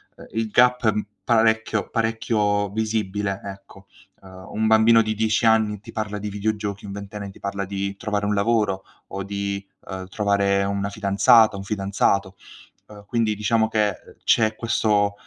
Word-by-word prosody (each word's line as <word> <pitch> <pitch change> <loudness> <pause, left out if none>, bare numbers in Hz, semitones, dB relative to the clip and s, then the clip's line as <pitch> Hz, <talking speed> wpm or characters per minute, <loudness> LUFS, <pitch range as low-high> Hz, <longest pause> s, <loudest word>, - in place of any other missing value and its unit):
uhm, - - -13
il 115 0 -1
gap 125 +1 +3
è - - +6
m 105 -1 -2 0.2
parecchio 110 -2 +2
parecchio 110 -3 0
visibile, 105 -2 -2
ecco. 100 0 -11 0.3
Uhm, 95 0 -13
un 110 +1 0
bambino 110 +1 +6
di 110 -1 -1
10 110 +1 +1
anni 110 -2 +3
ti - - -11
parla 105 -1 -4
di 105 +1 -4
videogiochi, 105 0 -3
un 100 - -7
ventenne 100 0 -7
ti - - -17
parla 100 0 -3
di 100 0 -3
trovare 105 0 -2
un 105 - +1
lavoro, 100 -2 +1 0.2
o 100 - -5
di, 100 0 -4 0.2
uhm, 95 -1 -6
trovare 100 0 +1
una 100 0 -2
fidanzata, 110 +2 +4
un 95 - -6
fidanzato, 100 -1 0 0.5
uhm, 105 -1 -13
quindi 110 -1 0
diciamo 110 +2 +1
che, 105 -3 +1
uhm, - - -15
c'è 110 -1 +3
questo, 105 -3 +1
105 Hz, 165 wpm, -23 LUFS, 100-110 Hz, 0.5 s, è